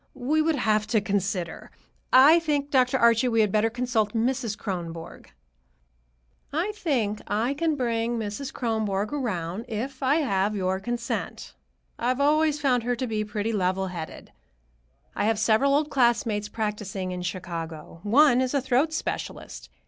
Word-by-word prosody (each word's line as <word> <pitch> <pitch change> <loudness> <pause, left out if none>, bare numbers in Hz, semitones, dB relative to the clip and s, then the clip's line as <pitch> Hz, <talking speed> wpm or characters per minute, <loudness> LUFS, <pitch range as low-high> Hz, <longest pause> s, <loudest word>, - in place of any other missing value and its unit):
We 300 +6 +1
would 320 0 +1
have 215 -5 +1
to 220 0 +2
consider. 195 -3 -2 0.4
I 290 +6 +8
think, 290 -3 -1
Dr. 255 -1 +3
Archie, 235 0 +4
we 225 -2 +3
had 210 -2 +2
better 215 +2 +2
consult 235 -3 -1
Mrs. 235 -2 0
Kronborg." 170 -4 -6 1.2
"I 335 +8 -1
think 260 - -1
I 220 +6 0
can 315 +1 0
bring 235 -2 -1
Mrs. 225 +5 -4
Kronborg 215 -3 -1
around, 210 - -3
if 260 +5 -5
I 270 +2 +3
have 210 -9 +1
your 190 -1 -1
consent. 235 +3 -4 0.5
I've 250 +2 0
always 300 +1 +3
found 260 -4 +2
her 245 +1 -1
pretty 215 -2 -2
level 190 -1 0
headed. 170 -3 -8 0.8
I - - 0
have 220 0 +2
several 225 +6 +3
old 300 +1 0
classmates 230 -5 +1
practicing 210 -4 -3
in 180 0 -4
Chicago. 170 -3 -6
One 250 +4 +5
is 260 +2 -1
a - - +4
throat 265 +5 +1
specialist. 315 - -5
230 Hz, 145 wpm, -26 LUFS, 205-265 Hz, 1.2 s, I